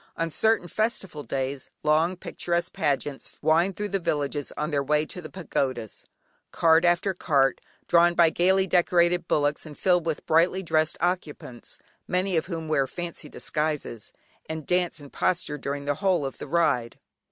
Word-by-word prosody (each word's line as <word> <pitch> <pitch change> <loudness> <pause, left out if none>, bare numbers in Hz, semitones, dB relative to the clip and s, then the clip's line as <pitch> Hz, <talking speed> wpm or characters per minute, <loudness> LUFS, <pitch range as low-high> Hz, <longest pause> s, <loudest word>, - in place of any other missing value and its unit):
On 165 0 -1
certain 220 0 +2
festival 195 -6 -2
days 135 +1 -3
long 160 +4 +2
picturesque 170 0 -2
pageants 145 -2 -2
wind 165 +5 +2
thro' 210 - -2
the 200 -1 -1
villages 145 -4 -2
on 150 +2 -2
their 140 -1 +1
way 150 +2 +1
to 180 - -6
the 155 - -9
pagodas; 130 - -3 0.4
cart 165 0 +4
after 175 +3 +2
cart 140 -7 +1 0.3
drawn 175 0 +4
by 170 -2 +5
gaily 190 +3 +3
decorated 175 -1 +2
bullocks 145 0 +1
and 150 -2 -10
filled 175 -3 +2
with 160 -3 -2
brightly 175 +4 +3
dressed 155 -2 +1
occupants, 160 -8 -3 0.3
many 185 +1 0
of 160 - 0
whom 165 -3 -5
wear 140 -3 +1
fancy 175 +4 -6
disguises, 150 -7 -2 0.4
and 160 -2 -5
dance 180 -2 0
and 145 -1 -13
posture 160 -5 0
during 140 0 -4
the 145 - +1
whole 175 0 +1
of 135 - -6
the - - -6
ride. 135 -7 +1
160 Hz, 165 wpm, -26 LUFS, 145-175 Hz, 0.4 s, by